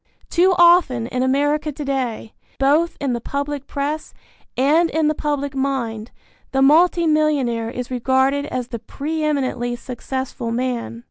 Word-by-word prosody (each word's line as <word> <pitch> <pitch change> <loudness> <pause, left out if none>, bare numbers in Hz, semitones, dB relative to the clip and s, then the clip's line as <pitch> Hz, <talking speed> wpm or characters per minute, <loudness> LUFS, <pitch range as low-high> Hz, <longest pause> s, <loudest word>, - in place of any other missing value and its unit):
Too 370 +2 +4
often 340 -9 +5
in 250 +1 -3
America 290 +3 +1
to 290 +1 -6
day, 255 -5 -3 0.2
both 295 +5 +2
in 275 -3 -1
the 235 - -3
public 280 +2 -4
press 290 +2 -4 0.4
and 310 +6 +3
in 315 -1 +1
the - - +1
public 285 -2 -2
mind, 250 -5 -2 0.4
the 270 0 +3
multi 335 +4 +5
millionaire 285 -8 +1
is 250 +1 -6
regarded 265 +3 +1
as 250 -3 -4
the 235 - -5
pre 305 +7 -4
eminently 260 -5 -1
successful 250 0 -5
man. 235 -1 -2
275 Hz, 145 wpm, -20 LUFS, 250-300 Hz, 0.4 s, often